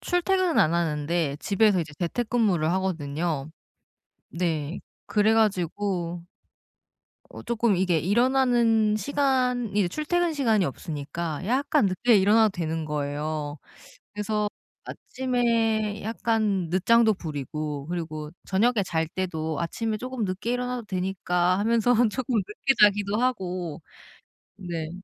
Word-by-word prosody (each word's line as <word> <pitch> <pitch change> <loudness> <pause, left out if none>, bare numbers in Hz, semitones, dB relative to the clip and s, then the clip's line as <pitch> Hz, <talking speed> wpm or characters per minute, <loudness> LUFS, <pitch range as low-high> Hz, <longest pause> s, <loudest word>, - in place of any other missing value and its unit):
출퇴근은 360 -1 +1
안 155 +2 +4
하는데 155 -2 0
집에서 200 -2 +3
이제 155 -2 -6
재택근무를 200 -4 0
하거든요. 160 -5 -2 0.8
네 165 -2 -2 0.3
그래 215 +1 +2
가지고 180 -4 0 1.1
어 - - -10
쪼끔 235 -4 +1
이게 180 -3 +2
일어나는 235 - +3
시간이 250 -7 0
출퇴근 340 - 0
시간이 225 -9 +2
없으니까 155 +3 -4
약간 255 +1 +2
늦게 205 +5 +3
일어나도 210 +2 +4
되는 160 -3 -3
거예요. 150 0 -3 0.6
그래서 210 0 -1 0.4
아침에 230 -4 -1
약간 215 -5 0
늦장도 220 +4 +4
부리고 150 -2 -5
그리고 155 -3 -5
저녁에 215 +2 +2
잘 160 -2 -1
때도 160 -5 -3
'아침에 215 +6 -2
쪼금 255 0 -4
늦게 195 +5 -2
일어나도 250 -2 -3
되니까.' 185 -1 0
하면서 230 +2 +2 0.2
쪼끔 255 +1 -2
늦게 210 +7 0
자기도 205 0 +4
하고 180 -10 -2 0.8
네. 165 -4 -5
195 Hz, 270 characters per minute, -26 LUFS, 165-230 Hz, 1.1 s, 안